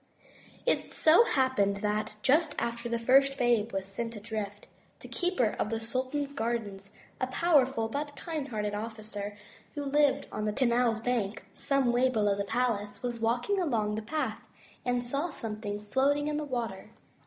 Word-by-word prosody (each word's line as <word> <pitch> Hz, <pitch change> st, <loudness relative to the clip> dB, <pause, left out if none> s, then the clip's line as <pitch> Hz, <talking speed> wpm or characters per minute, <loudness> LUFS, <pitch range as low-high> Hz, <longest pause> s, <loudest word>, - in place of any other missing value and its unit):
It -, -, 0 dB
so 330 Hz, +9 st, +6 dB
happened 260 Hz, -, +2 dB
that, 210 Hz, +1 st, -1 dB
just 295 Hz, +3 st, +3 dB
after 235 Hz, 0 st, -2 dB
the 235 Hz, -, 0 dB
first 270 Hz, +4 st, +4 dB
babe 235 Hz, -3 st, +2 dB
was 195 Hz, -1 st, -2 dB
sent 230 Hz, +4 st, -4 dB
adrift, 210 Hz, -1 st, -5 dB, 0.4 s
the -, -, -9 dB
keeper 350 Hz, -, 0 dB
of -, -, 0 dB
the 225 Hz, 0 st, -1 dB
sultan's 260 Hz, +5 st, -2 dB
gardens, 220 Hz, -6 st, -3 dB, 0.3 s
a 255 Hz, -, 0 dB
powerful 265 Hz, -6 st, +3 dB
but 290 Hz, +5 st, -4 dB
kind 310 Hz, -5 st, -4 dB
hearted 210 Hz, -5 st, -2 dB
officer, 210 Hz, -1 st, -5 dB, 0.4 s
who 290 Hz, -, -3 dB
lived 285 Hz, 0 st, +3 dB
on 215 Hz, -, -3 dB
the 210 Hz, -, 0 dB
canal 235 Hz, -2 st, +2 dB
bank 225 Hz, -4 st, -1 dB
some 275 Hz, -3 st, +1 dB
way 250 Hz, +2 st, +3 dB
below 210 Hz, -5 st, +2 dB
the 200 Hz, 0 st, -2 dB
palace, 210 Hz, -2 st, -1 dB
was 240 Hz, -1 st, -2 dB
walking 240 Hz, -, +1 dB
along 225 Hz, -, 0 dB
the 215 Hz, -, -2 dB
path 240 Hz, -2 st, -2 dB, 0.4 s
and 245 Hz, -1 st, 0 dB
saw 280 Hz, +8 st, -1 dB
something 210 Hz, -5 st, -5 dB
floating 285 Hz, +2 st, +2 dB
in 300 Hz, 0 st, -1 dB
the 305 Hz, -, -2 dB
water. 235 Hz, -8 st, -4 dB
235 Hz, 165 wpm, -30 LUFS, 215-275 Hz, 0.4 s, so